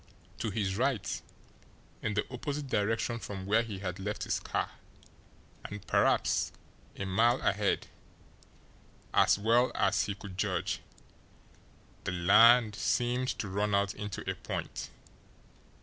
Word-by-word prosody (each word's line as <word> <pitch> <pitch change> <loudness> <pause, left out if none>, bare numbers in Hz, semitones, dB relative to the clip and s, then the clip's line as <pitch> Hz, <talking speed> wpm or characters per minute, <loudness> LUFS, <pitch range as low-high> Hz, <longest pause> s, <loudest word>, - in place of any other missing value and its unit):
To 110 - -1
his 100 -2 -1
right, 120 -6 0 0.8
in 105 - -2
the 105 - +1
opposite 145 +3 -3
direction 115 0 0
from 95 -2 -6
where 105 +4 +3
he 110 -4 -5
had 95 -1 -4
left 105 +2 -3
his - - -1
car, - - -2 0.9
and 105 -1 -8
perhaps - - +2 0.4
a 100 - -4
mile 115 +6 +3
ahead, 100 0 +1 1.3
as - - +5
well 115 +4 +3
as - - +2
he 100 - -3
could 95 -2 -10
judge, 95 -4 -1 1.2
the - - -1
land 105 +5 +6
seemed 120 +6 0
to 105 - -3
run 100 +2 0
out 100 0 +1
into 105 -2 -6
a - - +1
point. - - -5
105 Hz, 130 wpm, -31 LUFS, 100-115 Hz, 1.3 s, land